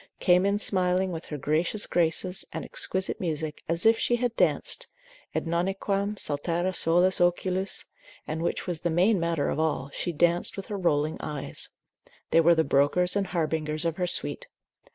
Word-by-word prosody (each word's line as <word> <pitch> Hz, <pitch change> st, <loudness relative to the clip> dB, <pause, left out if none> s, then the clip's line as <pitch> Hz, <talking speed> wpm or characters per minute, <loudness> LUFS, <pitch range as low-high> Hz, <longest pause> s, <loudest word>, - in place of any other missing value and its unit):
came 180 Hz, +1 st, +4 dB
in 200 Hz, +1 st, +1 dB
smiling 185 Hz, -2 st, +2 dB
with 165 Hz, -1 st, -6 dB
her 150 Hz, -, -6 dB
gracious 155 Hz, +9 st, 0 dB
graces 175 Hz, +2 st, 0 dB
and -, -, -5 dB
exquisite 190 Hz, 0 st, -1 dB
music, 155 Hz, -3 st, -3 dB
as 165 Hz, +3 st, 0 dB
if 225 Hz, 0 st, +5 dB
she 240 Hz, -, +2 dB
had 240 Hz, -1 st, -1 dB
danced, -, -, +1 dB, 0.5 s
et -, -, -1 dB
nonnunquam 195 Hz, +4 st, -1 dB
saltare 170 Hz, +4 st, -1 dB
solis 175 Hz, +2 st, +3 dB
oculis, 185 Hz, +2 st, +1 dB, 0.4 s
and 160 Hz, +1 st, -4 dB
which 170 Hz, -, -2 dB
was 175 Hz, -4 st, -3 dB
the 175 Hz, -, 0 dB
main 185 Hz, +5 st, +3 dB
matter 170 Hz, -3 st, 0 dB
of -, -, -2 dB
all, 150 Hz, -3 st, -1 dB
she 175 Hz, -, -2 dB
danced 170 Hz, +3 st, +1 dB
with 195 Hz, -, -5 dB
her 205 Hz, -, -5 dB
rolling 155 Hz, -3 st, +1 dB
eyes: 150 Hz, -2 st, -4 dB, 0.6 s
they 165 Hz, -, +6 dB
were 170 Hz, +1 st, +5 dB
the 160 Hz, -, +3 dB
brokers 160 Hz, +7 st, +2 dB
and 200 Hz, -1 st, 0 dB
harbingers 155 Hz, -2 st, -2 dB
of 165 Hz, -1 st, -1 dB
her 180 Hz, -1 st, 0 dB
suite. -, -, -2 dB
175 Hz, 175 wpm, -27 LUFS, 160-190 Hz, 0.6 s, they